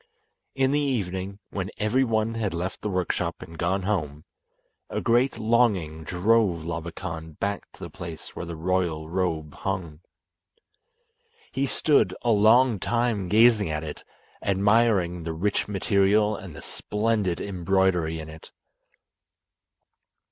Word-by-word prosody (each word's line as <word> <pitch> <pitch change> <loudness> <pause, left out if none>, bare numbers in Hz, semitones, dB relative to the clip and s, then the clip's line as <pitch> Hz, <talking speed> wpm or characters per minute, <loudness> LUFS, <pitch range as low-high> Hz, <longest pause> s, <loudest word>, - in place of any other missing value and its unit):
In 135 0 +2
the 145 - +2
evening, 100 -8 -2
when 95 -1 -3
every 110 +5 +2
one 110 -2 0
had 105 -6 -2
left 90 +3 -4
the 105 - -2
workshop 90 -2 -1
and 85 - -11
gone 95 +3 0
home, 75 -7 -2 0.6
a - - -2
great 120 +2 +2
longing 110 -9 +1
drove 90 0 +2
Labakan 80 -1 -5
back 100 -1 -3
to - - -17
the - - -6
place 85 -3 -8
where 85 - -5
the 85 - -5
royal 85 -2 -1
robe 80 -4 -2
hung. 90 -6 -4 1.5
He 140 +1 0
stood 150 +2 +2
a 120 - +3
long 110 +2 +5
time 115 -3 0
gazing 110 -2 +5
at 75 0 -2
it, 75 -2 -7 0.4
admiring 100 -3 +2
the 80 0 -4
rich 100 +5 0
material 105 +1 +2
and 90 -6 -9
the - - -9
splendid 105 -4 -1
embroidery 90 -3 +1
in 80 - -7
it. 80 0 -12
95 Hz, 135 wpm, -26 LUFS, 85-110 Hz, 1.5 s, long